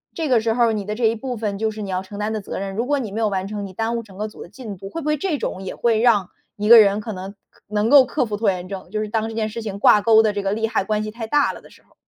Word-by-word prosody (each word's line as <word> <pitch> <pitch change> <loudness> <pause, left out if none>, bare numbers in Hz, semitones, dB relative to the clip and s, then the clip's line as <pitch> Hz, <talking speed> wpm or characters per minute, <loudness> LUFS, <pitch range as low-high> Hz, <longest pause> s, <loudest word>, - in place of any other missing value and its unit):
这 325 -2 -2
个 245 -5 +3
时 225 0 0
候 240 - +3
儿 - - 0
你 210 -2 -2
的 210 +1 -3
这 235 +1 0
一 225 +1 +3
部 245 +1 -5
分 205 -2 -3
就 220 0 +1
是 215 0 -6
你 195 - -5
要 185 0 -1
承 195 +2 -10
担 210 +1 -2
的 215 - -3
责 - - -6
任。 195 0 -4
如 235 +4 -2
果 290 - +2
你 235 -7 -4
没 215 - -4
有 220 -2 +2
完 190 -1 -2
成， 205 0 -5
你 - - -11
耽 225 +4 -2
误 235 - -2
整 200 -4 -15
个 210 +1 -3
组 210 - -13
的 - - -10
进 210 0 -8
度， 195 +2 -9
会 330 - -5
不 - - -9
会 300 0 +2
这 310 0 -1
种 190 - -4
也 190 - -6
会 230 -2 +1
让 220 -6 +3 0.3
一 210 0 -3
个 235 0 +11
人， 205 -1 +4
可 215 0 -5
能 190 +1 -7 0.2
可 - - -28
能 210 +2 0
够 280 -2 +8
克 295 - 0
服 210 -2 -4
拖 215 -1 +2
延 180 -1 -6
症， 195 -1 -8
就 215 - -3
是 215 - -3
当 220 +1 -1
这 225 - -8
件 220 -1 -1
事 230 +2 -6
情 210 -3 -5
挂 210 - +6
钩 220 0 +5
的 215 -1 +1
这 205 - -2
个 195 - 0
利 225 +1 -1
害 220 - 0
关 215 +1 -1
系 215 - -5
太 225 0 -6
大 290 +4 +2
了 - - -11
的 - - -17
时 - - -20
候。 - - -31
215 Hz, 395 characters per minute, -21 LUFS, 200-230 Hz, 0.3 s, 个